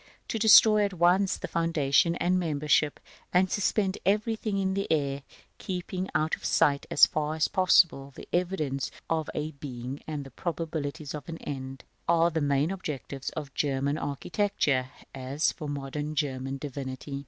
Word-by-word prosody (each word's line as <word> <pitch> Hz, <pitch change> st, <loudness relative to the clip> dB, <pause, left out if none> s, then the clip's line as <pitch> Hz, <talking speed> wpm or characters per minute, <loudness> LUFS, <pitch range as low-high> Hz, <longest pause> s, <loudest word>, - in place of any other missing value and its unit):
To 225 Hz, -, -2 dB
destroy 215 Hz, -1 st, +7 dB
at 200 Hz, -1 st, -1 dB
once 180 Hz, +3 st, +3 dB
foundation 165 Hz, -2 st, +1 dB
and 180 Hz, +1 st, +1 dB
membership, 150 Hz, -2 st, +1 dB, 0.3 s
and 185 Hz, +1 st, +3 dB
suspend 200 Hz, -1 st, 0 dB
everything 215 Hz, +1 st, 0 dB
in 190 Hz, -1 st, 0 dB
the 195 Hz, +1 st, -2 dB
air, 140 Hz, -3 st, 0 dB, 0.4 s
keeping 185 Hz, 0 st, -4 dB
out 155 Hz, +1 st, +1 dB
of -, -, -20 dB
sight, 145 Hz, -3 st, +2 dB
as 140 Hz, -, +7 dB
far 155 Hz, 0 st, -2 dB
as 160 Hz, -, +2 dB
possible, 170 Hz, -7 st, +3 dB
the -, -, -10 dB
evidences 165 Hz, -7 st, -1 dB, 0.2 s
of 160 Hz, -2 st, 0 dB
a 150 Hz, +1 st, -2 dB
beginning 135 Hz, -2 st, -7 dB
and 150 Hz, -3 st, -4 dB
the 135 Hz, -, -11 dB
probabilities 160 Hz, -2 st, -4 dB
of 150 Hz, +1 st, -7 dB
an 165 Hz, -, -5 dB
end, 135 Hz, -3 st, -7 dB, 0.2 s
are 170 Hz, 0 st, +4 dB
the 160 Hz, 0 st, -1 dB
main 145 Hz, +3 st, +1 dB
objects 145 Hz, -7 st, -5 dB
of 145 Hz, -3 st, -5 dB
German 140 Hz, +1 st, 0 dB
architecture, 145 Hz, -3 st, -1 dB, 0.2 s
as 135 Hz, +3 st, -1 dB
of 150 Hz, -, -3 dB
modern 145 Hz, +2 st, -4 dB
German 135 Hz, -2 st, -2 dB
divinity. 140 Hz, 0 st, -6 dB
155 Hz, 155 wpm, -28 LUFS, 140-180 Hz, 0.4 s, destroy